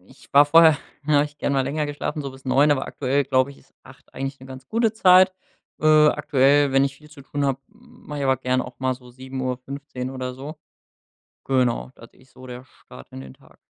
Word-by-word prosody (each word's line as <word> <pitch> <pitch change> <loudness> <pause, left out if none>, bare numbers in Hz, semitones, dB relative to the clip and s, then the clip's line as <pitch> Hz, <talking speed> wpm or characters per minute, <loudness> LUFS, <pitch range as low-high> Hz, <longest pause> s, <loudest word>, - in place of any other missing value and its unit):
Ich 130 +9 -21
war 145 +1 +7
vorher, 160 0 +6 0.3
da 155 - +2
hab - - +2
ich 150 0 -11
gern - - -1
mal 135 -1 +2
länger 150 +3 -2
geschlafen, 145 +1 -4
so 140 - -5
bis 130 0 -16
9, 140 +3 +3
aber 135 - -2
aktuell, 140 +1 -1
glaub 130 +1 +1
ich, 140 - -13
ist - - -26
8 - - -18
eigentlich 135 0 -5
'ne 130 - -12
ganz 130 -1 -11
gute 225 -1 +1
Zeit. 185 -3 +5 0.5
Äh, 155 0 +5
aktuell, 140 0 +2
wenn 135 +1 +4
ich 140 0 -4
viel 150 +1 -18
zu 145 -2 -14
tun 145 +1 -3
hab, 135 -1 -1
m 235 +3 -22
mach 150 - -6
ich 140 - -3
aber 130 -1 +2
gern 130 0 -1
auch 125 -1 -11
mal 130 0 0
so 125 -1 -16
7:15 130 +1 -6
oder 130 -1 -5
so. 145 +4 -9 0.9
Genau, 125 - 0
das - - -15
ist 130 0 -24
so 130 - -13
der 125 +1 -9
Start 65 - -16
in 65 - -9
den 65 -1 -12
Tag. - - -23
135 Hz, 230 wpm, -22 LUFS, 130-145 Hz, 0.9 s, war